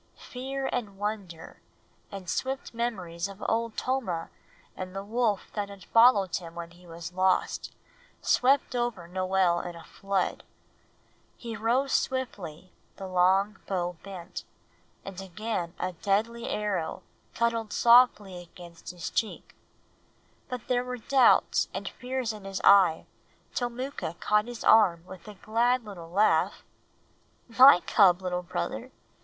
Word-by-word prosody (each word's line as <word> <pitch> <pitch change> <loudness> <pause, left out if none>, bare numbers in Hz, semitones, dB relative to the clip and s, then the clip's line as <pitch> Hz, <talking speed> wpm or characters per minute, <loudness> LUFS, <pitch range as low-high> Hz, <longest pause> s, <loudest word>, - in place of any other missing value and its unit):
Fear 265 +2 -5
and 210 -5 -3
wonder, 200 -5 -5 0.5
and 195 -2 -8
swift 265 +9 -3
memories 190 -7 -3
of 195 0 -10
Old 230 0 -1
Tomah 230 -11 -2 0.4
and 185 0 -7
the 195 - -4
wolf 220 -1 -1
that 205 -1 -3
had 200 -3 -12
followed 225 -6 +5
him 170 -2 -10
when 170 0 -7
he 175 +1 -18
was 170 +1 -8
lost, 185 0 +1 0.5
swept 265 0 +2
over 240 -8 -2
Noel 185 -1 +1
in 175 0 -6
a 170 - -11
flood. 195 -2 -2 0.9
He 230 -2 -6
rose 250 +5 +1
swiftly, 185 -10 -3 0.2
the 195 - -8
long 190 +3 +2
bow 180 -2 -2
bent, 190 -3 -8 0.6
and 195 -1 -7
again 190 -2 -4
a 185 - -2
deadly 215 +6 -1
arrow 195 -6 -2 0.3
cuddled 230 -2 0
softly 235 -6 +4
against 170 -1 -12
his 175 -2 -6
cheek; 220 - -3 1.0
but 250 -3 -6
there 245 -1 +1
were 250 0 -5
doubts 260 +2 +3
and - - -4
fears 250 -2 -3
in 210 -2 -11
his 195 -1 -4
eye 190 -5 +6 0.5
till 245 -1 -1
Mooka 250 - -5
caught 210 0 +2
his 240 -1 -7
arm 175 -6 +5
with 190 +2 -12
a 210 - -9
glad 235 +4 +1
little 175 -5 -9
laugh 200 +5 +2 0.8
"My 250 -4 +8
cub, 190 -3 +4
little 180 -1 -2
brother. 125 - -4
200 Hz, 135 wpm, -28 LUFS, 180-235 Hz, 1.0 s, My